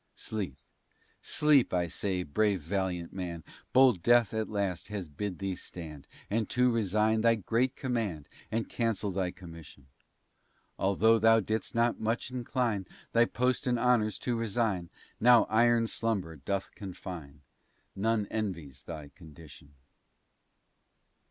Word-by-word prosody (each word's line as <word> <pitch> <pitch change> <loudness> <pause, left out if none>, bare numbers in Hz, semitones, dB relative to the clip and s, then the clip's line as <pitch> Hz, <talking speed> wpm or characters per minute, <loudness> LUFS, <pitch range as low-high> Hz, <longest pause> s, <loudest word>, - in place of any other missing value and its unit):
Sleep, 95 -11 -4 0.6
sleep, 150 -4 +3
I 90 -1 +1
say, 90 +2 -2
brave 100 +5 +1
valiant 90 0 -2
man, 85 -4 -5 0.3
Bold 130 -8 +5
death, 120 +1 +4
at 110 -1 -2
last, 100 -4 -2
has 100 -4 -5
bid 90 +6 -4
thee 95 -1 -2
stand 80 -6 -9 0.2
And 110 0 -1
to 125 0 +3
resign 110 0 +2
thy 115 0 +4
great 115 +5 0
command, 110 - -2 0.2
And 115 +1 -1
cancel 110 -4 -1
thy 95 -1 -1
commission. 85 -6 -12 0.9
Altho' 110 +4 +4
thou 115 +1 +6
didst 110 +3 -3
not 115 +1 +2
much 115 +3 -2
incline 120 -6 -1 0.2
Thy 115 0 +5
post 125 +4 0
and 120 -1 +2
honors 115 -3 +2
to 125 - -2
resign; 110 -6 -1 0.3
Now 120 0 +7
iron 120 +1 +4
slumber 105 -8 -2
doth 95 +7 -3
confine; 90 -8 -8 0.5
None 110 +1 +1
envy's 85 - -4
thy 75 -4 -8
condition. 75 -2 -15
105 Hz, 130 wpm, -30 LUFS, 90-115 Hz, 0.9 s, Now